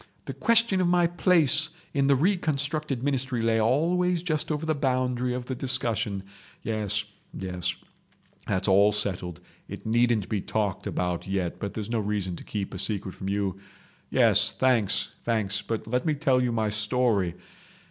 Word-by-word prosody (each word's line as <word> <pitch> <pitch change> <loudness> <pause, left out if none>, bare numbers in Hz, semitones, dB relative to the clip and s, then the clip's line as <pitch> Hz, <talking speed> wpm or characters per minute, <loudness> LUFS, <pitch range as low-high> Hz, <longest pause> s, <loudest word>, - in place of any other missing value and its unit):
The - - -5
question 230 -5 +3
of 180 - +2
my 175 0 +4
place 165 -3 +3 0.2
in 140 -1 +2
the 140 - +5
reconstructed 150 -5 0
ministry 130 -4 0
lay 115 -1 +2
always 170 +8 +2
just 155 -3 -1
over 150 +1 -2
the 160 - +1
boundary 125 -3 0
of 125 -1 -4
the 130 - -3
discussion. 115 -6 -1 0.4
Yes—yes. 100 -4 -4 0.7
That's 95 +2 -1
all 100 +2 +5
settled. 90 -4 -2 0.3
It - - -9
needn't 115 -2 +2
be 105 -3 -1
talked 105 -2 -2
about 90 0 -2
yet, 95 -3 -2
but 100 - -5
there's 110 0 -4
no 115 - +1
reason 100 -4 -2
to - - -10
keep 100 -2 -4
a 95 - -5
secret 100 -3 -1
from 95 - -6
you..... 100 -2 -1 0.5
Yes—thanks! 120 -6 +3
thanks! 110 -3 0
But 115 -1 -4
let 125 +3 -1
me 155 -2 +1
tell 135 -3 +2
you 125 -1 +1
my 110 -2 0
story. 105 -4 +1
115 Hz, 155 wpm, -27 LUFS, 100-140 Hz, 0.7 s, the